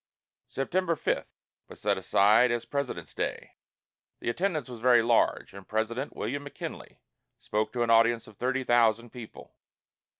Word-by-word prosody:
September 170 +5 -1
5 - - -1 0.4
was - - -13
set - - +1
aside 105 +5 +4
as 120 -1 -1
President's 140 -2 -4
Day. - - -4 0.7
The 120 - -1
attendance 170 0 -1
was 120 -2 -9
very 120 -2 +5
large, 115 0 +1
and 100 0 -11
President 115 +5 -2
William 140 +3 -3
McKinley 145 - -8 0.4
spoke 105 +1 -2
to 120 -1 0
an 115 - +1
audience 115 0 +4
of 110 - -15
thirty 130 +4 -1
thousand 115 -1 +2
people. 120 -3 -11
120 Hz, 145 wpm, -28 LUFS, 115-135 Hz, 0.7 s, very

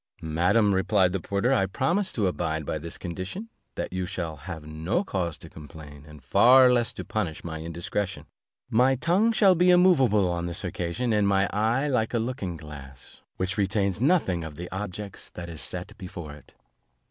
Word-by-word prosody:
"Madam," 90 +7 +2
replied 95 0 +2
the 95 - 0
porter, 100 +9 0
"I 95 -7 +2
promise 170 - 0
to 105 - 0
abide 80 -4 -1
by 80 - -2
this 85 +2 -6
condition, 95 - -6 0.3
that - - -4
you 95 -1 -2
shall 85 -3 -4
have 75 +1 -8
no 80 - -1
cause 90 - -3
to - - -12
complain, 75 -1 -12
and 75 -1 -14
far 125 0 +6
less 120 -3 +1
to - - -7
punish 95 -8 -3
my 80 -2 -5
indiscretion; 85 +4 -3 0.4
my 125 +4 +3
tongue 180 - +2
shall 200 -4 +5
be 180 +1 +3
immovable 140 - +5
on 85 -1 -2
this 85 +2 -4
occasion, 90 +6 -2
and 105 -1 +3
my 100 0 +3
eye 115 +7 +1
like 120 -4 0
a - - +3
looking 110 -7 -3
glass, 70 -4 -11 0.2
which 95 +2 -2
retains 100 0 0
nothing 130 - +2
of 80 -2 -7
the 85 +3 -6
objets 100 0 -6
that 85 0 -8
is 80 -3 -6
set 90 +4 -4
before 90 -5 -8
it." 75 - -16
95 Hz, 180 wpm, -26 LUFS, 85-120 Hz, 0.4 s, far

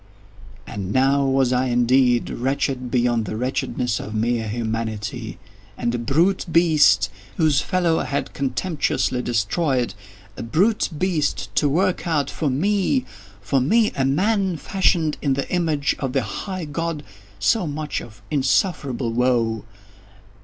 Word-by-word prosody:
And 100 -3 -5
now 135 +3 +3
was 135 -1 +2
I 125 +1 +2
indeed 125 0 +3
wretched 130 0 -1
beyond 120 -2 +1
the 105 - -4
wretchedness 125 -1 -1
of 110 - -6
mere 115 +1 0
Humanity. 110 -2 -4 0.4
And 120 - -1
_a 120 -1 -2
brute 170 +11 +2
beast 150 - +4 0.3
_—whose 155 -4 +3
fellow 175 -3 +1
I - - -2
had 140 -1 -3
contemptuously 140 -2 -1
destroyed—a 105 - -2
brute 190 - +1
beast 175 -3 -1
to 145 - +3
work 180 +4 0
out 150 -4 0
for 155 - -1
me—for 135 - -1
me 215 - +3
a 135 - 0
man, 190 +6 +1
fashioned 165 -3 +1
in 140 -3 +1
the 140 +1 -2
image 160 -5 +1
of 135 -2 -3
the 135 - +1
High 185 - -5
God—so 145 - -2
much 150 0 -3
of 105 -3 -13
insufferable 140 - 0
woe! 115 -3 +1
135 Hz, 130 wpm, -22 LUFS, 115-160 Hz, 0.4 s, beast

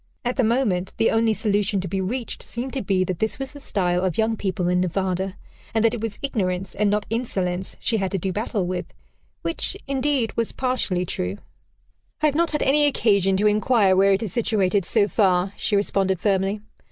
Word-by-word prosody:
At 245 - 0
the 255 - +2
moment, 220 -6 +1
the 225 - +3
only 225 -1 +2
solution 205 -2 +1
to 185 - -3
be 190 +2 -2
reached 230 +6 -4
seemed 245 +3 -5
to 270 - -2
be 190 -3 +1
that 185 -2 -3
this 220 - -1
was 270 0 -4
the 290 - -11
style 180 -8 0
of 185 -3 -1
young 225 0 +2
people 190 -3 -2
in 180 0 +2
Nevada, 190 +1 -1 0.4
and 225 0 +3
that 225 - +3
it 235 - -4
was 225 -2 -4
ignorance 190 -8 -1
and 210 0 +1
not 205 0 0
insolence 190 -6 -2
she 225 - 0
had 195 -2 -1
to 195 - -1
do 190 +1 -2
battle 210 -2 -1
with 180 0 -4 0.5
which, 335 +3 -2
indeed, 275 -3 0
was 230 -1 -1
partially 250 -9 0
true. 95 - -3 0.8
"I 305 - +1
have 300 - +3
not 335 +2 +2
had 300 - 0
any 290 +2 +4
occasion 200 -8 +2
to 205 - +1
inquire 210 -2 +4
where 195 +1 +5
it 195 - 0
is 205 - -4
situated, 200 -5 +1
so 205 0 +2
far," 190 -2 +2
she 210 - 0
responded 195 -2 +1
firmly. 195 +1 0
205 Hz, 205 wpm, -23 LUFS, 185-230 Hz, 0.8 s, where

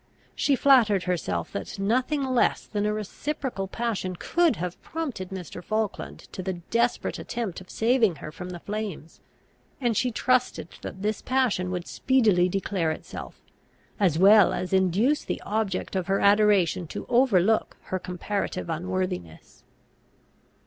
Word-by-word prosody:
She 280 - +2
flattered 235 -9 +5
herself 95 - -2
that 100 - -5
nothing 255 +8 +1
less 255 -2 +1
than 210 -1 -1
a - - +1
reciprocal 215 +1 -3
passion 200 -4 -2
could 335 - +2
have 180 0 -5
prompted 275 - -5
Mr. 180 -2 -7
Falkland 215 0 -3
to - - -5
the 190 +1 -2
desperate 230 +8 -1
attempt 225 -7 -4
of 185 - -15
saving 225 -5 +2
her 155 - -8
from 180 +2 -8
the 175 -1 -6
flames; 205 -7 -5 0.6
and 240 -4 +1
she 250 - +2
trusted 250 -6 +1
that 190 - -7
this 215 0 -1
passion 250 -9 +1
would 180 -1 -3
speedily 210 -9 +3
declare 190 -3 -1
itself, 155 - -7 0.6
as 180 -6 +3
well 200 +3 +7
as 185 - -3
induce 190 - +2
the - - -3
object 210 -3 -2
of 185 -2 -1
her 195 0 +2
adoration 200 -4 +4
to - - -6
overlook 225 -4 +3
her 185 - -3
comparative 180 -1 -3
unworthiness. 170 - -4
200 Hz, 140 wpm, -26 LUFS, 180-235 Hz, 0.6 s, well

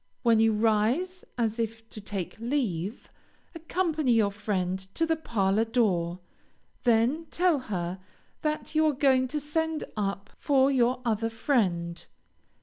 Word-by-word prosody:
When 230 -2 +4
you 225 0 +5
rise 230 - +1
as 225 -1 0
if 225 0 -3
to 215 - -8
take 195 -3 -5
leave, 230 - -2 0.4
accompany 320 -5 0
your 215 -3 +3
friend 190 -3 -2 0.2
to 330 - +2
the 325 0 +1
parlor 215 -8 +1
door, 185 -7 0 0.6
then 245 +8 +2
tell 350 -4 +2
her 180 -1 -3 0.4
that 305 0 -2
you 315 0 +3
are 300 - +2
going 260 -1 +3
to 300 +4 -2
send 320 +2 -1
up 200 -1 -3
for 275 -1 +3
your 250 -1 +2
other 225 0 0
friend. 185 -9 0
230 Hz, 140 wpm, -28 LUFS, 205-295 Hz, 0.6 s, you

